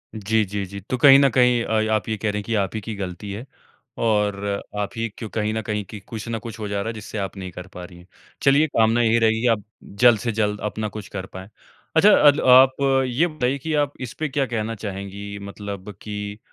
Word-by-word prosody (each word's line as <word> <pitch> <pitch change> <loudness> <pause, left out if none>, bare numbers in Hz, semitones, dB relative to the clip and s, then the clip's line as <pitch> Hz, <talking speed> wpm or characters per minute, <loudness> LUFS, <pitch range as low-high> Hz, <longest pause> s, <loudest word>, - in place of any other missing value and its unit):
जी, 110 +1 +1
जी, 100 +1 -4
जी। 100 +1 -8
तो 130 - 0
कहीं 135 +2 +8
न 140 - +5
कहीं 125 -2 +4
अ, 110 -1 0
आप 105 -3 0
ये 110 - -1
कह 105 +1 -1
रहे 105 - -3
हैं - - -6
की 115 - -1
आप 95 - -6
ही 110 - -3
की 110 +1 -6
गलती 95 +1 -6
है 110 +6 -6 0.6
और 105 -3 +2 0.4
आप 100 -1 -1
ही 115 0 -1
क्यूँ 110 - -6
कहीं 110 -1 -1
न 110 - -2
कहीं 105 -1 -3
कि 105 +2 -9
कुछ 110 +3 -8
न 115 -1 -2
कुछ 115 0 -9
हो 105 - -4
जा 100 0 -2
रहा 110 - -4
है 115 - -2
जिससे 110 0 -8
आप 100 -1 -4
नहीं 95 -1 -6
कर 90 +2 -9
पा 90 - -8
रही 90 -1 -14
है। 85 - -16 0.4
चलिए 140 +3 +5
कामना 115 -3 +2
यही 115 0 +3
रहेगी 110 0 +2
की 125 - +2
आप 105 - -12 0.4
जल्द 120 -4 +7
से 115 +1 -2
जल्द 105 -1 -1
अपना 110 +1 -4
कुछ 100 - -7
कर 95 -1 -4
पाएँ। 95 +2 -8 0.5
अच्छा 200 +6 +7 0.2
अद 145 +1 +6 0.2
आप 130 0 +6 0.3
ये 135 +8 +1
बताइए 140 -4 -1
कि 160 -1 -2
आप 140 - -16
इसपे 140 +5 -4
क्या 135 0 0
कहना 115 -2 -3
चाहेंगी 100 +1 -6
मतलब 100 0 -7
कि 105 0 -6
110 Hz, 245 wpm, -22 LUFS, 100-120 Hz, 0.6 s, कहीं